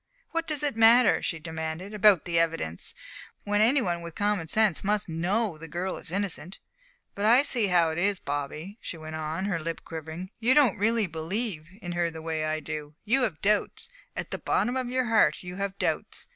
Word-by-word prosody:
"What 330 0 -2
does 300 -2 -2
it 285 -5 +1
matter," 230 +2 +6
she 165 - -2
demanded, 160 +4 -5
"about 205 -5 +5
the 170 -2 +1
evidence, 165 - -2 0.5
when 205 +1 +1
any 250 +4 +4
one 175 -2 -1
with 170 -1 -8
common 205 -5 0
sense 215 0 +2
must 205 0 0
know 175 +2 -1
the 165 - -8
girl 175 +4 -3
is - - -9
innocent? 185 -1 -3 0.6
But 200 - -2
I 240 +5 +6
see 235 -7 +2
how 170 -3 +3
it 160 - -3
is, 195 +1 +1
Bobby," 150 +8 -5
she 170 - -5
went 155 0 -7
on, 160 +4 -3
her 195 -5 -1
lip 165 +1 -4
quivering. 160 +3 -7
"You 240 +3 +4
don't 275 -11 +4
really 225 +1 +2
believe 165 +1 -3 0.2
in 175 - -4
her 175 -1 0
the 160 -1 -8
way 160 -1 -3
that 155 - -1
I 155 0 -1
do. 150 -1 -6
You 255 +5 +3
have 165 -11 -2
doubts 210 - +1 0.3
at - - -5
the - - -3
bottom 245 - 0
of 255 -2 -2
your 255 0 0
heart 225 -3 +3
you 180 0 -7
have 200 0 -3
doubts. - - -2
185 Hz, 210 wpm, -27 LUFS, 160-220 Hz, 0.6 s, matter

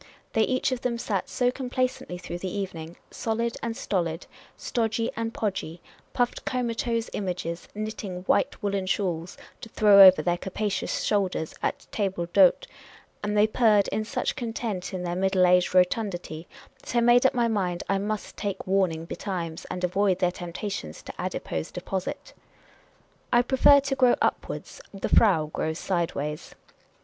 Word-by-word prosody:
They 220 - +3
each 255 +3 +1
of 255 -1 -2
them 235 -2 -1
sat 205 -5 -2
so 245 -1 +1
complacently 255 -7 -2
through 175 0 -6
the 185 - -4
evening 175 -4 -5
— - - -36
solid 230 +1 0
and 230 0 -3
stolid, 170 -8 -2 0.3
stodgy 225 0 -1
and 225 0 -2
podgy, 190 -7 -3 0.3
stuffed 245 -1 -1
comatose 235 -2 -1
images, 180 -3 -4
knitting 210 -4 -5
white 265 +5 +1
woollen 200 -2 -1
shawls, 180 -3 -2 0.2
to 225 - -10
throw 205 -2 +6
over 185 -1 +9
their 175 0 0
capacious 200 +1 -2
shoulders 190 -6 0
at - - -2
tablc 185 -4 -2
d' - - +1
hotc 185 -2 +6 0.3
— - - -26
and 210 0 -1
they 210 - +6
purred 215 -2 +3
in 215 - -1
such 215 - -2
content 225 -6 -4
in 185 -2 -4
their 175 0 -2
middle 190 0 +3
aged 180 0 +3
rotundity 180 -4 0 0.3
that - - -7
I 235 - +4
made 240 +1 +5
up 265 0 +3
my 240 -1 +2
mind 185 -6 -1
I 195 0 +1
must 210 +1 -4
take 200 -2 -4
warn 190 -2 +2
ing 160 0 -6
betimes, 170 -3 -5
and 180 - -6
avoid 185 +1 +2
their 180 -1 +1
temptations 175 - -6
to - - -8
adipose 80 -1 -3
deposit. 190 - -5 1.0
I 240 0 +5
prefer 270 +3 +6
to 275 0 -2
grow 255 -2 +4
upwards; - - -2
the 195 - -4
frau 185 -9 +5
grows 160 0 -2
sideways. 165 -5 -3
195 Hz, 165 wpm, -26 LUFS, 180-230 Hz, 1.0 s, over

